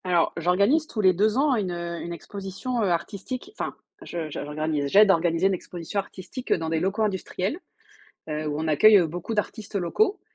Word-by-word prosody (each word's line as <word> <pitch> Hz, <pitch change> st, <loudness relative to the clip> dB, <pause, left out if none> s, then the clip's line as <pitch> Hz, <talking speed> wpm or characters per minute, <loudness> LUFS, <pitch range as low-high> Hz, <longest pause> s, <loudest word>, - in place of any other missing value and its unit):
Alors 175 Hz, -2 st, +2 dB
j'organise 200 Hz, -, +3 dB
tous 225 Hz, -, -6 dB
les 185 Hz, -2 st, +5 dB
2 210 Hz, +5 st, +2 dB
ans 280 Hz, -1 st, +3 dB
une, 205 Hz, -5 st, -1 dB
heu, 170 Hz, -1 st, -4 dB
une 170 Hz, -, -5 dB
exposition, 200 Hz, +7 st, -4 dB
heu, 200 Hz, -, +2 dB
artistique, 205 Hz, -, -3 dB
enfin, -, -, -4 dB, 0.3 s
je 165 Hz, -3 st, -5 dB
je -, -, -4 dB
j'organise, 150 Hz, 0 st, -2 dB
j'aide 205 Hz, +8 st, +6 dB
d'organiser 170 Hz, 0 st, +3 dB
une 195 Hz, -, +1 dB
exposition 175 Hz, +2 st, -4 dB
artistique 200 Hz, +6 st, -7 dB
dans 160 Hz, -2 st, -2 dB
des 160 Hz, 0 st, +1 dB
locaux 195 Hz, +5 st, 0 dB
industriels, 195 Hz, -, -2 dB, 0.7 s
heu, 155 Hz, 0 st, -3 dB
où 145 Hz, -1 st, -2 dB
on 160 Hz, -, -2 dB
accueille, 205 Hz, +8 st, +7 dB
heu, 175 Hz, -, +3 dB
beaucoup 175 Hz, +7 st, -4 dB
d'artistes 210 Hz, 0 st, -3 dB
locaux, 380 Hz, -, +1 dB
185 Hz, 190 wpm, -25 LUFS, 165-215 Hz, 0.7 s, accueille